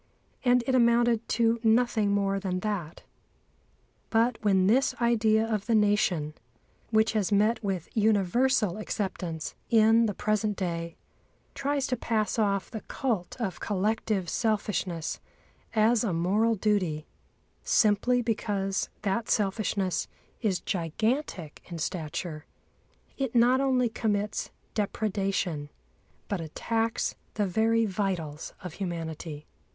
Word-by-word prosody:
And 250 -1 +4
it 265 - 0
amounted 235 -2 +3
to 230 0 +3
nothing 225 -2 +3
more 195 -1 +1
than 185 -2 -2
that. 185 -6 -4 1.1
But 230 +1 +2
when 190 -3 +4
this 245 +7 +3
idea 225 -2 +3
of 215 -2 -2
the 230 - +3
Nation, 205 -8 +2 0.6
which 220 0 +3
has 210 -2 0
met 215 +3 +2
with 190 -4 -2
universal 215 0 +2
acceptance 180 -6 -4 0.2
in 225 0 +5
the 205 - -3
present 215 -1 0
day, 170 -2 -3 0.6
tries 280 0 -1
to 255 - 0
pass 220 -2 -1
off 200 -2 0
the 220 - -5
cult 230 -6 -2
of 205 -6 -3
collective 210 -1 -1
selfishness 200 -6 -1 0.6
as 220 +2 +4
a 205 -6 0
moral 205 +7 +2
duty, 185 -7 0 0.6
simply 240 +4 +3
because 200 -4 -1
that 215 +3 -1
selfishness 195 -3 0 0.3
is 200 -6 0
gigantic 185 - -2
in 170 - -7
stature, 155 -1 -4 0.7
it 265 -3 -2
not 245 +3 +5
only 255 -2 +2
commits 210 -2 -1 0.2
depredation, 195 -7 -1 0.6
but 200 -4 -2
attacks 225 +8 -1 0.2
the 210 - +1
very 225 +4 +2
vitals 185 -7 -3
of 180 -3 -6
humanity. 165 -4 -5
210 Hz, 115 wpm, -28 LUFS, 185-230 Hz, 1.1 s, in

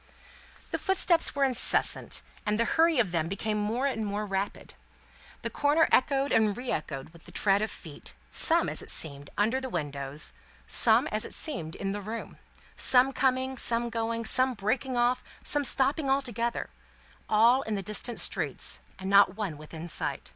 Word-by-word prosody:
The - - -2
footsteps 365 -5 +2
were 280 - +1
incessant, 260 -2 0 0.2
and 210 +1 -1
the 230 - +2
hurry 325 +5 +2
of 215 -8 +1
them 165 -2 -1
became 210 +3 -3
more 225 +6 -1
and 250 -5 -1
more 205 +1 -3
rapid. 195 0 -4 0.7
The - - -3
corner 295 +3 +2
echoed 275 +1 +2
and 215 -2 +2
re 250 0 -4
echoed 140 -3 -5
with 165 0 -19
the - - -13
tread 200 0 +1
of 215 - -1
feet; 155 -5 -11 0.2
some, - - +4
as - - -3
it - - -10
seemed, 140 -2 0
under 230 +6 +1
the 260 - -5
windows; 145 - -3 0.3
some, - - +6
as - - 0
it - - -1
seemed, 180 - -1
in 195 - -4
the 205 +1 -4
room; 220 +3 -7 0.4
some 260 +1 +5
coming, 260 -1 0
some 235 0 +3
going, 230 0 -3
some 255 +2 +1
breaking 245 +5 -2
off, 245 +1 +1 0.2
some 290 0 +1
stopping 275 +2 +1
altogether; 240 -4 -2 0.6
all 230 +5 +4
in 220 -5 -4
the 195 - -4
distant 215 +4 -2
streets, - - -1 0.2
and 190 - -7
not 200 -1 +5
one 200 -7 -4
within 155 +2 -9
sight. 165 - -3
225 Hz, 175 wpm, -28 LUFS, 195-260 Hz, 0.7 s, some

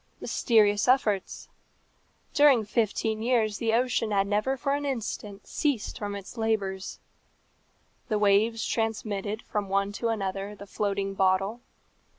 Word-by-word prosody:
Mysterious 210 -2 +2
efforts! 220 -7 +1 0.9
During 280 -7 +5
fifteen 220 0 0
years 225 -3 +1
the 225 -1 0
ocean 235 -2 +1
had 200 -2 +2
never 210 +7 0
for 275 +2 -1
an 290 0 -1
instant 220 -6 -4
ceased 280 -8 -1
from 205 -1 -4
its 200 +4 -9
labours. 200 -4 -2 1.1
The 215 - 0
waves 210 +2 +3
transmitted 215 -2 -2
from 205 -2 -3
one 200 +1 +1
to 230 +3 -3
another 200 -2 -2
the 200 - -10
floating 200 0 -2
bottle. 195 +4 +1
210 Hz, 130 wpm, -27 LUFS, 200-230 Hz, 1.1 s, During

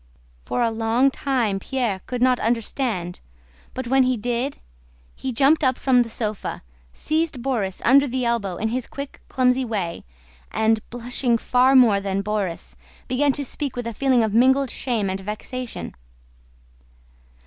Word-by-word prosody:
For 245 - 0
a 230 - +1
long 225 +4 +2
time 245 -9 0
Pierre 230 -4 -2
could 250 -1 -1
not 255 -1 +3
understand, 225 -5 -1 0.6
but 260 - -4
when 265 +2 +3
he 255 -1 +2
did, 245 +5 -2 0.6
he 265 - -4
jumped 280 +6 +3
up 260 -2 +2
from 255 -2 +3
the 235 - -2
sofa, 215 - -3 0.3
seized 310 - -2
Borís 220 -8 -2
under 280 +3 +6
the 255 0 -2
elbow 225 -6 0
in 220 - -1
his 245 +1 -3
quick, 280 0 -8
clumsy 255 0 +2
way, 200 -8 -3 0.5
and, 220 0 +2
blushing 245 0 0
far 250 +3 +3
more 230 -6 +6
than 195 0 -2
Borís, 200 -5 -3 0.3
began 280 +3 +2
to 285 - -3
speak 280 +1 -4
with 245 -1 -4
a 230 - -4
feeling 255 0 +2
of 215 -2 -1
mingled 265 +3 +4
shame 230 -6 -1
and 190 0 -2
vexation. 225 +5 -6
245 Hz, 155 wpm, -23 LUFS, 220-260 Hz, 0.6 s, under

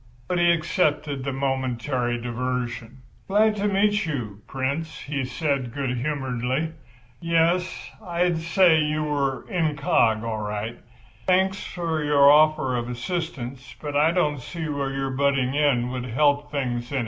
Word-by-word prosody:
But 180 - 0
he 175 0 +5
accepted 155 -4 0
the 140 - -2
momentary 130 -2 -1
diversion. 125 0 -4 0.2
"Glad 210 +2 +3
to 205 +1 0
meet 205 +1 +2
you, 110 -9 -4
Prince," 140 +5 -3
he 140 -1 -3
said, 135 -2 -1
good 135 -3 -1
humouredly. 130 +2 -2 0.5
"Yes, 170 +2 0
I'd 175 -1 0
say 170 0 +4
you 150 0 0
were 140 -3 -1
incog. 150 - +1
all 115 -2 -2
right. 105 +2 -4 0.5
Thanks 190 +1 +2
for 165 -3 -3
your 145 -1 +6
offer 150 -4 +4
of 120 0 -2
assistance—but 135 0 -5
I 150 +2 +4
don't 150 -5 +1
see 160 +5 -5
where 140 -2 -2
your 135 0 -2
butting 135 -1 +1
in 135 -5 +2
would 125 -1 -4
help 145 +4 +2
things 125 -4 -3
any. 140 - 0
140 Hz, 140 wpm, -24 LUFS, 125-160 Hz, 0.5 s, your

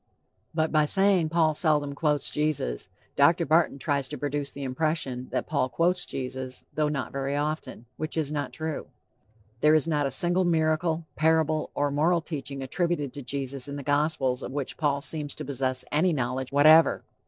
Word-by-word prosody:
But 160 -1 +1
by 155 -1 +3
saying 190 -1 +3
"Paul 160 -1 +2
seldom 150 -3 +1
quotes 150 -1 +1
Jesus," 150 - -1 0.3
Dr. - - +4
Barton 160 -1 +3
tries 140 -1 -1
to 150 - -6
produce 145 +1 -2
the 140 0 -8
impression 130 -2 -2
that - - -2
Paul 140 -4 0
quotes 175 +4 +1
Jesus, 130 -1 -5
though 155 -1 +1
not 140 -3 -3
very 140 +1 -2
often, 150 -5 -3
which 155 +1 -4
is 150 -2 -1
not 145 -3 -3
true. 160 -1 -5 0.7
There 150 +3 +5
is 155 +1 +2
not 150 -3 +1
a - - -2
single 175 +7 +3
miracle, 160 -1 +1
parable 155 -1 +2
or 145 0 0
moral 165 +4 +2
teaching 140 -4 -6
attributed 150 -1 -1
to 145 - -7
Jesus 135 0 -4
in 140 - -6
the 140 - -6
Gospels 145 -3 0
of - - -6
which 140 -1 -4
Paul 145 -3 0
seems 150 -1 -1
to 155 - -6
possess 130 -1 -2
any 165 +4 +2
knowledge 130 -1 -2
whatever. 155 +3 +6
150 Hz, 175 wpm, -27 LUFS, 140-160 Hz, 0.7 s, whatever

